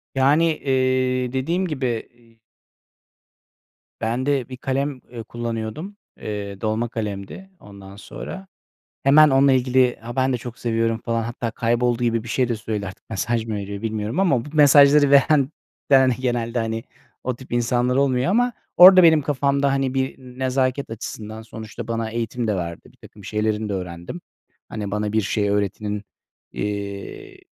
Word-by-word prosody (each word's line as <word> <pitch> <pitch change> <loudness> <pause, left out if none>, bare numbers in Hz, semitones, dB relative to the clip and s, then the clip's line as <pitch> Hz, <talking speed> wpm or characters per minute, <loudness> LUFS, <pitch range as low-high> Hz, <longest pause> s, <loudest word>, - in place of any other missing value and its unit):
Yani, 140 +5 +4
eee, 130 -1 0
dediğim 170 +8 -1
gibi, 130 -7 -3
iii 115 -1 -26 1.6
ben 115 +3 -1
de 140 -3 0
bir 130 - -7
kalem, 135 +1 -2
eee, 115 -2 -7
kullanıyordum. 120 - -5 0.2
Eee, 100 -2 -5
dolma 110 +2 -1
kalemdi, 105 - -6
ondan 100 -1 -13
sonra. 190 - -9 0.6
Hemen 150 +2 +6
onunla 135 +1 +4
ilgili, 130 -1 +3
"Ha, 120 +2 -8
ben 130 0 +2
de 125 - +1
çok 120 0 -9
seviyorum," 115 -1 0
falan, 115 -1 -1
hatta 120 0 -4
kayboldu 120 +1 0
gibi 115 -2 +1
bir 115 - -10
şey 125 +1 +1
de 120 - 0
söyledi 105 -2 -4
artık 95 - -11
mesaj 115 +2 -1
mı 110 - -3
veriyor 100 0 -6
bilmiyorum 110 - -2
ama 140 -11 +2
bu 150 - -9
mesajları 145 -1 +6
veren 140 0 +4 0.4
veren 130 -2 +6
genelde, 120 -2 -1
hani, 115 0 -2 0.4
o 125 -1 -2
tip 130 -1 -14
insanlar 120 +1 +1
olmuyor 135 0 +2
ama 245 +4 +2 0.2
orada 185 +1 +10
benim 160 -3 +6
kafamda, 140 0 +1
hani, 135 -1 0
bir 130 0 -1 0.2
nezaket 130 0 0
açısından 110 0 -7
sonuçta 110 0 -9
bana 115 -1 -2
eğitim 115 +1 -3
de 105 - +1
verdi. 85 -2 -4
Birtakım 100 -2 -16
şeylerini 105 +1 -1
de 100 - -3
öğrendim. 90 - -6 0.5
Hani, 105 -2 -5
bana 105 0 -2
bir 110 - +2
şey 100 +1 0
öğretenin, 105 +1 -2 0.5
eee, 100 -1 -5
120 Hz, 155 wpm, -22 LUFS, 110-135 Hz, 1.6 s, orada